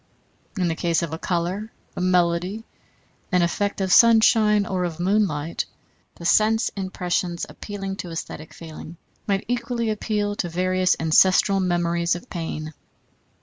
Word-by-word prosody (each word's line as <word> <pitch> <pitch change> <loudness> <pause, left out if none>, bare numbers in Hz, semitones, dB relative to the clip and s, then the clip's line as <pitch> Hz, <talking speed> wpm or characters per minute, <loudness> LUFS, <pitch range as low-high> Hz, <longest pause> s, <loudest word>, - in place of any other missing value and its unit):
In 180 -2 +1
the 165 - 0
case 170 +1 0
of 160 -2 -4
a 160 - -4
color, 185 +6 -2 0.2
a - - -4
melody, 180 +3 +1 0.7
an 180 -2 +3
effect 200 +4 -1
of 190 -1 0
sunshine 220 -2 +5
or 185 -2 -2
of 170 -2 -4
moonlight, 175 -5 0 0.5
the 170 - -10
sense 215 +5 +3
impressions 180 -2 -2
appealing 195 -2 -6
to 180 - -6
æsthetic 160 -2 -7
feeling 165 +1 -10 0.3
might 195 -1 0
equally 235 -1 -1
appeal 210 -1 -1
to 175 - -2
various 185 +2 +1
ancestral 185 +4 +4
memories 170 -2 +1
of 175 - -10
pain. 155 -2 -5
185 Hz, 140 wpm, -23 LUFS, 170-205 Hz, 0.7 s, sunshine